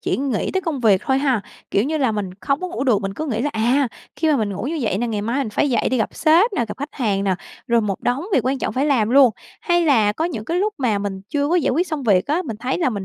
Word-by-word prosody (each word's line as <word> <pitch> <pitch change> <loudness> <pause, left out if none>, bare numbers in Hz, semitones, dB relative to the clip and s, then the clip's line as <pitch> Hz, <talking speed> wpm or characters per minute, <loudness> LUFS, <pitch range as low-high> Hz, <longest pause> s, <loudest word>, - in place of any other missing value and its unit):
chỉ - - -1
nghĩ 265 -6 -1
tới 380 - +1
công 315 -8 -3
việc 205 -5 +4
thôi 265 0 +2
ha. 265 -6 +1 0.3
Kiểu 200 +4 +2
như 310 +3 -1
là 255 -5 +1
mình 205 -3 -3
không 275 +6 0
có 365 - -3
ngủ 350 -6 -3
được, 215 -6 +2
mình 195 0 -3
cứ 310 - -4
nghĩ 230 -4 -2
là, 295 - 0
à, 245 +5 +2 0.3
khi 320 +1 +1
mà 290 - +3
mình 210 -4 -1
ngủ 195 - -5
như 315 +3 -2
vậy 205 -3 0
nè, 240 - -1
ngày 215 -3 -2
mai 235 +6 -1
mình 265 -6 -2
phải 275 +6 +1
dậy 235 - +1
đi 255 - 0
gặp 220 - -1
sếp 345 +8 +4
nè, 240 - 0
gặp - - -6
khách 285 +2 -5
hàng 200 -6 0
nè, 190 -1 +2 0.3
rồi 235 -2 +3
một 200 -3 -2
đống 255 +7 -1
việc - - +4
quan 265 0 0
trọng - - -2
phải 270 +3 0
làm 235 -7 +2
luôn. 265 -2 +7 0.3
Hay 345 -1 +2
là 220 -8 +3
có 315 +9 -2
những 235 -12 -3
cái 335 +9 -2
lúc 420 +2 0
mà 225 -6 +1
mình 200 -1 -4
chưa 290 0 0
có 345 - +1
giải 335 - +2
quyết 340 +8 +1
xong 305 -4 -4
việc 195 -6 +3
á, 320 +6 0
mình 230 - -6
thấy 250 +4 -2
là 325 -8 +1
mình 200 -3 -4
255 Hz, 315 wpm, -21 LUFS, 215-295 Hz, 0.3 s, luôn